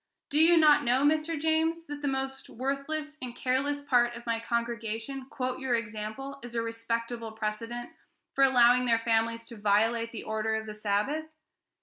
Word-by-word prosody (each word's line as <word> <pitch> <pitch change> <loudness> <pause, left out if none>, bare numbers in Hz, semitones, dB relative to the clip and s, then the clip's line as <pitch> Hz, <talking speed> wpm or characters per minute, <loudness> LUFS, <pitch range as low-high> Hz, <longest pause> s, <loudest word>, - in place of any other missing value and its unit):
Do 295 - +3
you 335 +2 +6
not 300 -2 +6
know, 255 +1 +2
Mr. 310 +2 +2
James, 320 +2 +1
that 290 -1 -7
the 290 - -1
most 270 0 -3
worthless 280 +4 -3
and 245 -2 -6
careless 280 +3 0
part 240 -3 +3
of 235 - -10
my 230 -1 0
congregation 235 +2 -3
quote 255 -2 -3
your 260 -2 +1
example 230 +5 -5
as 240 -1 -8
a 230 - +1
respectable 230 0 -3
precedent 225 +2 -4 0.4
for 275 - +3
allowing 250 -1 +5
their 230 -1 +4
families 230 0 0
to 235 - -9
violate 225 +3 +2
the 225 - -6
order 220 0 -1
of 220 0 -3
the 215 - -6
Sabbath? 215 +9 -1
240 Hz, 175 wpm, -29 LUFS, 230-275 Hz, 0.4 s, you